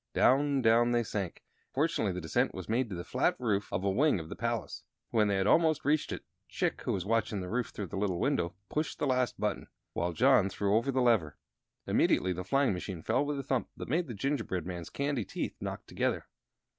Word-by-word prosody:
Down, 140 Hz, 0 st, +4 dB
down 120 Hz, +1 st, +4 dB
they 120 Hz, 0 st, +3 dB
sank, 100 Hz, -5 st, -4 dB, 0.2 s
and -, -, -51 dB
fortunately 140 Hz, -, +1 dB
the 90 Hz, 0 st, -4 dB
descent 80 Hz, -, 0 dB
was -, -, -6 dB
made 115 Hz, +2 st, 0 dB
to 95 Hz, -, -4 dB
the 85 Hz, -, -5 dB
flat -, -, +1 dB
roof 105 Hz, -5 st, -1 dB
of 90 Hz, +2 st, -1 dB
a 100 Hz, -, +2 dB
wing 140 Hz, -, +3 dB
of 80 Hz, -, -8 dB
the -, -, -5 dB
palace. -, -, -3 dB, 0.3 s
When 110 Hz, -2 st, +3 dB
they 100 Hz, -, +1 dB
had 95 Hz, 0 st, +1 dB
almost 160 Hz, +4 st, +3 dB
reached 150 Hz, +1 st, +2 dB
it, -, -, -5 dB, 0.2 s
Chick, -, -, -1 dB
who -, -, -1 dB
was 95 Hz, -2 st, -2 dB
watching 110 Hz, -1 st, 0 dB
the 90 Hz, -, -5 dB
roof 120 Hz, +3 st, 0 dB
through 105 Hz, -, -5 dB
the 95 Hz, -, -6 dB
little 95 Hz, -4 st, 0 dB
window, 95 Hz, -, 0 dB
pushed 150 Hz, +3 st, -2 dB
the -, -, -1 dB
last 130 Hz, -2 st, +1 dB
button, 105 Hz, -1 st, -1 dB, 0.3 s
while 85 Hz, +1 st, -1 dB
John 125 Hz, -2 st, +4 dB
threw 100 Hz, +2 st, 0 dB
over 115 Hz, +5 st, +2 dB
the 130 Hz, -1 st, +1 dB
lever. 105 Hz, -12 st, +2 dB, 0.5 s
Immediately 95 Hz, 0 st, +2 dB
the 90 Hz, +1 st, -5 dB
flying 135 Hz, 0 st, +2 dB
machine 90 Hz, -2 st, -5 dB
fell -, -, +2 dB
with 145 Hz, 0 st, -2 dB
a 140 Hz, -, -3 dB
thump 130 Hz, -3 st, -1 dB
that -, -, -6 dB
made 165 Hz, +4 st, +1 dB
the 120 Hz, -, -6 dB
gingerbread 110 Hz, -, -2 dB
man's 85 Hz, -2 st, -5 dB
candy 140 Hz, -4 st, -1 dB
teeth -, -, -4 dB
knock -, -, -5 dB
together. -, -, -1 dB
115 Hz, 225 wpm, -31 LUFS, 95-135 Hz, 0.5 s, Down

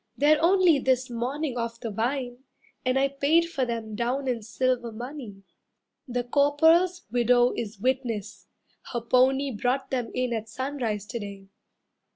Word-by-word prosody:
They're 300 Hz, +1 st, +4 dB
only 355 Hz, -4 st, +5 dB
this 260 Hz, -1 st, +1 dB
morning 250 Hz, +3 st, -2 dB
off 230 Hz, 0 st, -4 dB
the 230 Hz, -2 st, -5 dB
vine, 245 Hz, +3 st, -2 dB, 0.4 s
And 255 Hz, +1 st, +1 dB
I 275 Hz, +1 st, +3 dB
paid 300 Hz, +5 st, +2 dB
for 270 Hz, -6 st, 0 dB
them 230 Hz, -2 st, -4 dB
down 245 Hz, +5 st, -1 dB
in 240 Hz, -3 st, -1 dB
silver 240 Hz, +1 st, -1 dB
money. 240 Hz, -4 st, -8 dB, 0.6 s
The 245 Hz, -1 st, -2 dB
Corporal's 320 Hz, +7 st, +3 dB
widow 245 Hz, 0 st, +4 dB
is 220 Hz, -2 st, -5 dB
witness, 235 Hz, -4 st, -2 dB, 0.5 s
her 240 Hz, -, -1 dB
pony 265 Hz, +3 st, +3 dB
Brought 255 Hz, +4 st, -1 dB
them 245 Hz, -3 st, -1 dB
in 250 Hz, -1 st, 0 dB
at 220 Hz, -1 st, -4 dB
sunrise 240 Hz, -4 st, -3 dB
to 235 Hz, +2 st, -5 dB
day. 200 Hz, -2 st, -9 dB
250 Hz, 150 wpm, -26 LUFS, 230-275 Hz, 0.6 s, only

